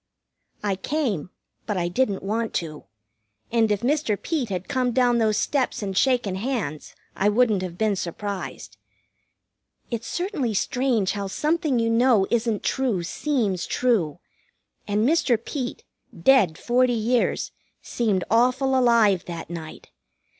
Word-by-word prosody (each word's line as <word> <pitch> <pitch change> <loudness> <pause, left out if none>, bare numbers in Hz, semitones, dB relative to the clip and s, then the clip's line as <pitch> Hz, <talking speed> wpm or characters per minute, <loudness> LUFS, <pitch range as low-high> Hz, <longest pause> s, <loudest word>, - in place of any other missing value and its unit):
I 200 -2 0
came; 225 - -2 0.4
but 210 -3 -1
I 175 -1 0
didn't 200 +1 0
want 220 +3 -2
to. 155 -3 -4 0.7
And 225 -2 +2
if 205 - 0
Mr. 255 -5 0
Peet 295 -9 -2
had 185 -1 -4
come 255 -3 0
down 245 -1 +3
those 215 -2 +2
steps 265 -6 0
and 195 -1 -3
shaken 245 -3 +2
hands 200 - -3 0.2
I 205 - +2
wouldn't 215 -3 +3
have 180 -2 -5
been 215 -1 +1
surprised. 195 +2 -5 1.1
It's 230 -1 -3
certainly 340 - -2
strange 245 -3 +1
how 200 -1 -3
something 300 - 0
you 230 0 +1
know 230 -3 +4
isn't 230 -3 0
true 245 -10 0
seems 205 - -1
true; 205 - +1 0.7
and 210 +3 +1
Mr. 285 -6 +3
Peet, 255 - -5 0.4
dead 215 -12 +4
forty 250 +1 +2
years, 235 +2 0 0.3
seemed 210 -6 0
awful 255 +3 +3
alive 230 -7 +4
that 170 -1 -7
night. 160 -2 -8
230 Hz, 135 wpm, -24 LUFS, 195-255 Hz, 1.1 s, know